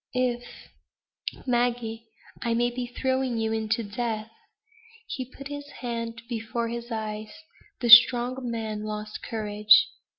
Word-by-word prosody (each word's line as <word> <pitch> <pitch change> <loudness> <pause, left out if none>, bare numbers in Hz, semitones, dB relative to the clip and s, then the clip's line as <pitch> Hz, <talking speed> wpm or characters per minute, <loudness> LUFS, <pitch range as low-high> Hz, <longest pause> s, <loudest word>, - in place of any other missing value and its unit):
"If 245 -1 0 1.0
Maggie, 240 -2 -1 0.3
I 235 -1 0
may 240 +1 +1
be 245 0 -4
throwing 260 0 -1
you 220 0 0
in 220 -1 -2
to 230 +2 +1
death." 220 0 -3 0.7
He 260 - -5
put 270 +2 -10
his 285 0 -6
hand 230 -1 -4
before 230 0 -3
his 235 +1 -6
eyes. 215 -1 -4 0.5
The 240 - 0
strong 245 +1 +8
man 220 -2 -3
lost 210 0 -5
courage. 210 - +4
235 Hz, 130 wpm, -26 LUFS, 220-245 Hz, 1.0 s, strong